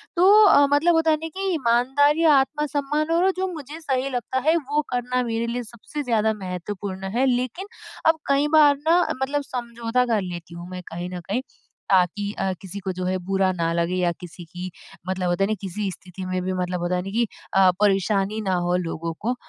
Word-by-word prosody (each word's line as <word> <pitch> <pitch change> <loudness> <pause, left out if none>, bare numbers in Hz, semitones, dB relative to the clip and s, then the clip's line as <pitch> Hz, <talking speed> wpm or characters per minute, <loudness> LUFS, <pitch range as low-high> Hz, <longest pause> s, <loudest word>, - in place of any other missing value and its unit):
तो 400 +5 +7
अ, 285 -7 +6
मतलब 335 +4 +4
होता 325 -1 +3
नहीं 320 +1 -6
कि 390 - -2
ईमानदारी 280 +4 +2
आत्मसम्मान 295 +2 0
और 355 +3 +3
जो 380 0 0
मुझे 305 +1 -8
सही 265 -2 -1
लगता 255 +1 -2
है 325 - +5
वो 295 +1 +1
करना 250 0 -1
मेरे 230 +1 -1
लिए 245 +1 -2
सबसे 235 +6 -7
ज़्यादा 220 -3 +1
महत्वपूर्ण 190 0 -5
हैं। 260 +2 +3
लेकिन, 255 - -1 0.4
अब 320 0 +4
कई 280 +1 +3
बार 290 -2 +7
ना 345 +2 +5 0.2
मतलब 285 +2 0
समझौता 235 0 -1
कर 225 -4 +1
लेती 175 -2 -7
हूँ 175 +1 -8
मैं 185 0 -6
कहीं 175 +2 -5
न - - -4
कहीं, 240 +6 0 0.5
ताकि 195 +2 +2
अ, 190 -1 0
किसी 195 +1 -7
को 190 -1 -3
जो 180 0 -4
है 185 0 0
बुरा 190 -1 +2
ना 165 -1 -1
लगे 175 +2 -1
या 175 - +2
किसी 175 -1 -10
की 180 +2 -7 0.4
मतलब 185 -1 -1
होता 175 +3 +1
है 210 - +1
न - - +1
किसी 195 +1 -3
स्थिति 185 +1 -9
में 185 0 -2
भी 185 0 -2
मतलब 180 -1 -2
होता 175 +1 0
है 180 - 0
न - - -5
कि 235 +1 +1 0.3
अ, 190 -1 +6
परेशानी 200 +1 +2
ना 190 -2 -1 0.2
हो 180 - +2
लोगों 165 0 -4
को, 245 +3 -1
225 Hz, 205 wpm, -23 LUFS, 185-280 Hz, 0.5 s, तो